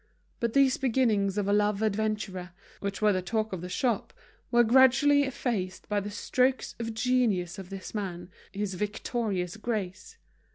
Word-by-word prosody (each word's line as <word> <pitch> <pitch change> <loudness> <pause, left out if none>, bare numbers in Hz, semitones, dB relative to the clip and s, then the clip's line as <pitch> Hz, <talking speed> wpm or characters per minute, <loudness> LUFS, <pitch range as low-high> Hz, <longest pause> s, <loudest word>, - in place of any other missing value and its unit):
But 235 -1 -1
these 275 -2 +4
beginnings 220 -7 +1
of 205 -1 0
a 200 - +2
love 210 0 +2
adventurer, 210 -4 -2 0.3
which 200 +1 -4
were 210 -1 +5
the 185 - 0
talk 215 +3 -2
of 180 - -4
the 180 - -6
shop, 235 +3 -1 0.4
were 240 0 +5
gradually 265 +4 +5
effaced 215 -8 -3
by 210 -1 +1
the 205 +1 -5
strokes 255 +5 0
of 230 -1 -4
genius 220 -7 +1
of 185 -2 -9
this 195 -1 -7
man, 180 -4 -5 0.2
his 200 -1 -3
victorious 205 -1 -2
grace. 210 -5 -4
210 Hz, 160 wpm, -28 LUFS, 195-240 Hz, 0.4 s, were